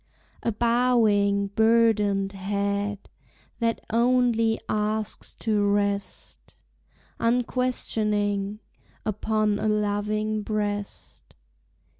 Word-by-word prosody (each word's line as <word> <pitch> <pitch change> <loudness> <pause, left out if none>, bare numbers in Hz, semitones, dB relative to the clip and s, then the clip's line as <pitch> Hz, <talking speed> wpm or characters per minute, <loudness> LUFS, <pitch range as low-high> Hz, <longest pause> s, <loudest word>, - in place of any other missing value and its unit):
A 230 - 0
bowing, 215 -4 +2
burdened 210 -3 +2
head 200 +1 -2 0.5
That 230 -1 0
only 235 -1 +2
asks 215 0 -2
to 215 -2 +1
rest, 200 -1 -2 0.6
Unquestioning, 215 -4 0 0.4
upon 215 0 0
A - - -1
loving 210 +1 0
breast. 205 - -4
210 Hz, 70 wpm, -25 LUFS, 205-225 Hz, 0.6 s, bowing